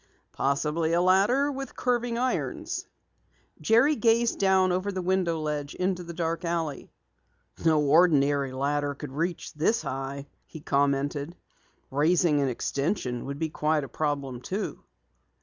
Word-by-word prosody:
"Possibly 150 +4 0
a 170 - +3
ladder 200 +11 +3
with 270 -1 -6
curving 240 -1 0
irons." 255 +1 -2 0.7
Jerry 240 +7 +4
gazed 230 0 +2
down 190 -1 +3
over 185 +3 -1
the 190 - -4
window 180 -3 +1
ledge 150 -2 -3
into 180 0 -1
the 170 -1 -8
dark 165 0 -2
alley. 165 -4 -3 0.7
"No 160 -2 +4
ordinary 145 -3 +3
ladder 145 +2 -1
could 130 - -8
reach 165 +5 -3
this 160 +9 +1
high," 135 +1 -4 0.2
he 160 - -10
commented. 145 +2 0 0.6
"Raising 150 +1 +3
an 140 - +1
extension 135 - -2
would 140 +1 -5
be 160 +1 -2
quite 150 0 0
a - - -5
problem, 140 -3 -3
too." 195 +10 -4
160 Hz, 135 wpm, -27 LUFS, 140-185 Hz, 0.7 s, Jerry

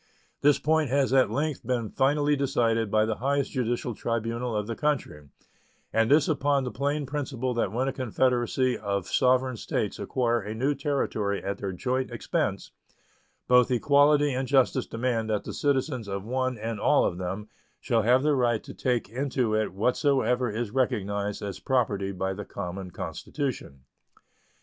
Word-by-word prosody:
This 145 0 +5
point 155 -2 +1
has 135 0 +2
at 130 -5 +5
length 145 +5 -1
been 120 -4 -2
finally 145 +2 +2
decided 120 -6 +1
by 110 +1 +3
the 110 -1 -2
highest 140 +2 0
judicial 120 -1 -1
tribunal 115 +2 -2
of 105 -1 -1
the 115 +1 -4
country, 130 - -2 0.7
and 115 0 +3
this 150 +1 +5
upon 145 -3 +1
the 125 - -3
plain 145 +2 -1
principle 130 -3 -3
that 115 -5 0
when 125 +5 -1
a 135 - -1
confederacy 125 0 +1
of 100 -3 -2
sovereign 130 -1 +2
States - - -2
acquire 120 -2 0
a 105 +1 -6
new 135 +6 +1
territory 135 -8 -1
at 100 0 -3
their 100 -2 -3
joint 130 +7 -2
expense - - -2 0.8
both 125 -1 +5
equality 145 +3 +4
and 130 +1 -2
justice 130 -2 +2
demand 115 -1 -1
that 105 -2 0
the - - -6
citizens 130 -5 0
of 100 0 -4
one 130 +1 -1
and 110 0 -4
all - - +4
of 90 - -2
them 95 +4 -4 0.3
shall 115 -1 +1
have 125 +5 +3
the 150 0 +3
right 120 -4 +1
to - - -9
take 125 -3 -1
into 125 0 -1
it 110 0 0
whatsoever 125 +4 +1
is 110 0 -3
recognized 105 -6 -1
as 100 -2 -5
property 105 -7 0
by 95 0 -2
the 105 +2 -6
common 95 -1 -6
Constitution. 85 - -5
125 Hz, 165 wpm, -27 LUFS, 110-135 Hz, 0.8 s, This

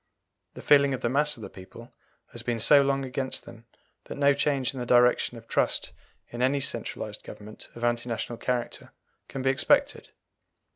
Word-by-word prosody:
The - - -10
feeling 140 -2 +5
of - - -9
the 120 - 0
mass 150 +2 +2
of 110 - -11
the - - -7
people 95 -1 -13 0.4
has - - -3
been 120 -1 -2
so 140 +6 +6
long 135 0 0
against 130 0 -3
them 115 0 -14 0.4
that - - -8
no 140 0 +4
change 140 -3 0
in 130 - -7
the 120 - -3
direction 125 0 +3
of 115 0 -14
trust - - 0 0.4
in 120 - -6
any 135 +2 +2
centralized - - -3
government 105 +1 -11
of 120 - -9
anti 120 0 0
national 115 0 -4
character 125 -1 -3 0.3
can 135 -1 -6
be 135 - +3
expected. 130 - +1
125 Hz, 185 wpm, -27 LUFS, 120-140 Hz, 0.4 s, so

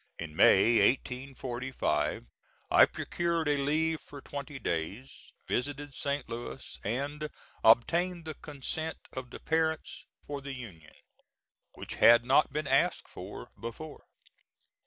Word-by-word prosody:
In 80 -2 -7
May, 110 +7 +6
1845, 130 - 0 0.5
I - - +8
procured 170 -2 -1
a 145 - +3
leave 155 +2 +1
for 145 - -11
twenty 140 0 -7
days, 100 +6 -4 0.2
visited 145 +2 -2
St. 140 0 -2
Louis, 115 - -7
and 145 +7 -2 0.3
obtained 170 +10 +4
the 155 - -4
consent 150 +2 -4 0.2
of 130 -1 -6
the - - -9
parents 160 0 -1 0.2
for 145 -1 -5
the 140 0 -6
union, 95 -12 -10 0.8
which - - -7
had 120 +1 +8
not 135 +3 +4
been 150 +1 -2
asked - - +2
for - - -9
before. 130 +7 -8
140 Hz, 120 wpm, -30 LUFS, 120-150 Hz, 0.8 s, I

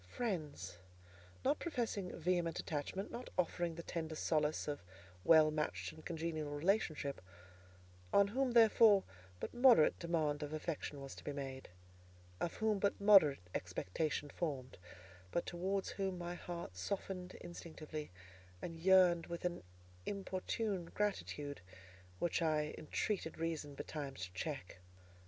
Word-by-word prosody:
Friends, 150 - -3 0.7
not 285 +3 +3
professing 230 - -2
vehement 170 0 +1
attachment, 160 +6 -3
not 245 +1 -6
offering 175 -1 0
the 170 - -6
tender 160 -2 -3
solace 155 -1 +1
of 145 -1 -2 0.4
well 155 +2 +7
matched 150 0 -2
and 160 - -13
congenial 160 -2 -3
relationship; 155 -4 +1 0.9
on 200 0 +5
whom, 255 +2 +1
therefore, 220 -3 +7 0.4
but - - -4
moderate 240 - +6
demand 160 -4 0
of 150 0 -4
affection 155 -2 -3
was 135 -1 -7
to - - -11
be - - -3
made, 135 -2 -5 0.7
of 170 - -1
whom 220 -2 +1
but 200 0 +1
moderate 185 - +6
expectation 95 - -2
formed; 135 - -4 0.5
but 170 - -1
towards 190 +3 -1
whom 190 -2 -2
my 175 0 -4
heart 175 - -6
softened 185 - -4
instinctively, 155 -3 -7 0.5
and 165 - -6
yearned 180 -1 +6
with 170 +1 -5
an 175 0 -1 0.5
importunate 195 -1 -2
gratitude, 150 - -2 0.6
which 170 - 0
I 155 -2 +1
entreated 165 +2 -2
Reason 160 -3 -3
betimes 140 -8 -5
to 90 - -13
check. 135 - -4
165 Hz, 130 wpm, -37 LUFS, 150-190 Hz, 0.9 s, well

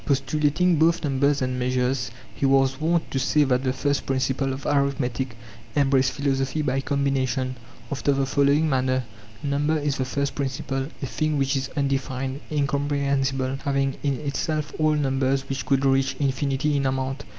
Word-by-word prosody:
Postulating 150 +5 +2
both 165 +3 +3
numbers 140 0 +2
and 130 0 -2
measures 125 -1 0 0.2
he - - -7
was 135 +1 +3
wont 165 +1 +1
to 135 - 0
say 150 +3 +3
that 130 -2 +1
the 130 - +1
first 140 +1 -1
principle 135 0 0
of 130 +1 -6
arithmetic 135 -4 0 0.4
em 140 -2 +3
braced 130 -1 +3
philosophy 140 +1 0
by 135 -1 0
combination, 135 -2 0 0.4
after 140 +1 +1
the 135 0 +1
following 140 +3 +3
manner: 130 -2 +1 0.2
' 110 - -21
Number 145 +2 +1
is 145 -2 -1
the 130 - -1
first 140 +2 -1
principle, 135 -1 -2 0.2
a - - +1
thing 155 +3 -1
which 135 0 +1
is 135 0 -2
unde 140 -1 +1
fined, 130 +1 -4
incomprehensible, 140 -2 0
having 135 -1 0
in 140 -3 -1
itself 150 +1 -2
all 155 0 +3
numbers 135 -1 0
which 135 0 -4
could 135 0 +2
reach 135 0 +2
infinity 140 +1 0
in 140 -1 +1
amount. 130 +1 -2
135 Hz, 170 wpm, -24 LUFS, 130-145 Hz, 0.4 s, both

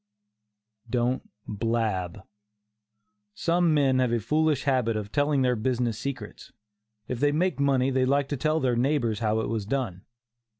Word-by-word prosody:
DON'T 125 +2 -1 0.2
BLAB. 105 -4 -2 1.1
Some 170 - +2
men 135 -4 +3
have 125 -2 +2
a 120 - +1
foolish 150 +4 +1
habit 125 -5 +1
of 105 -1 -5
telling 145 -1 +2
their 125 -1 +2
business 120 -1 -1
secrets. 140 +2 -6 0.6
If 125 - -4
they 145 +2 +3
make 175 +2 0
money 135 -2 +2
they 130 0 +2
like 140 +1 +1
to 145 - -2
tell 155 +4 +1
their 125 -4 +1
neighbors 120 -4 +1
how 110 -1 +1
it - - -3
was 110 -2 -3
done. 110 -8 -3
130 Hz, 155 wpm, -26 LUFS, 115-140 Hz, 1.1 s, men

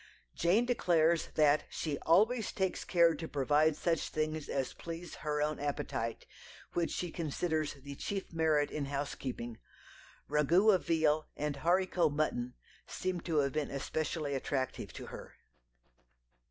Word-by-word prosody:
Jane 190 +8 +3
declares 170 -8 +3
that 150 -1 +4
she 150 -4 -3
"always 220 +7 +3
takes 190 -1 -1
care 170 -2 +4
to 160 +1 -5
provide 150 +2 +2
such 165 +1 0
things 155 -1 -2
as 135 -2 -1
please 170 +1 -7
(her) 150 -1 -1
own 150 0 -1
appetite," 125 -5 -3 0.5
which 170 -1 +1
she 175 -2 -3
considers 160 -1 -1
"the 140 0 -9
chief 195 +6 -4
merit 155 -3 +2
in 150 -2 -2
housekeeping." 135 -4 -4 0.7
Ragout 170 +8 +4
of 185 - 0
veal 155 -2 +2
and 150 -1 -2
haricot 175 0 +2
mutton 125 -5 -1 0.3
seem 185 -2 -3
to 165 -3 -1
have 140 -1 -1
been 145 -2 -2
specially 155 0 -2
attractive 135 -1 -2
to - - -7
her. - - -9
155 Hz, 140 wpm, -33 LUFS, 145-170 Hz, 0.7 s, that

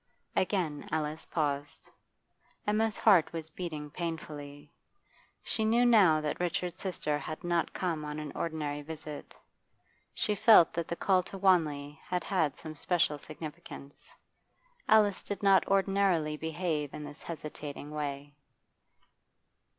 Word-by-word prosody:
Again 175 -6 0
Alice 155 0 -2
paused. 145 -2 -2 0.8
Emma's 215 +1 +1
heart 190 -7 +5
was 160 -1 -6
beating 155 -4 -5
painfully. 150 -4 -6 0.7
She 220 - -1
knew 230 +3 +4
now 195 -10 +6
that 150 -1 -2
Richard's 180 0 -2
sister 155 -6 -1
had 155 - -6
not 175 -1 0
come 165 -5 -2
on 150 0 -5
an 150 -1 -5
ordinary 150 -3 -3
visit; 150 -1 -8 0.8
she 210 - 0
felt 215 -5 +7
that 170 0 -2
the 170 - -3
call 185 +1 +3
to 190 +2 -9
Wanley 155 -6 +2
had 180 -1 -2
had 165 -7 +1
some 155 -1 -8
special 155 -1 +1
significance. 155 -2 -9 0.8
Alice 210 -3 +5
did 205 0 -5
not 195 -1 +5
ordinarily 195 -5 +2
behave 160 -2 -2
in 150 - -6
this 145 +1 -9
hesitating 150 -2 -7
way. 145 -1 -4
160 Hz, 125 wpm, -31 LUFS, 150-185 Hz, 0.8 s, felt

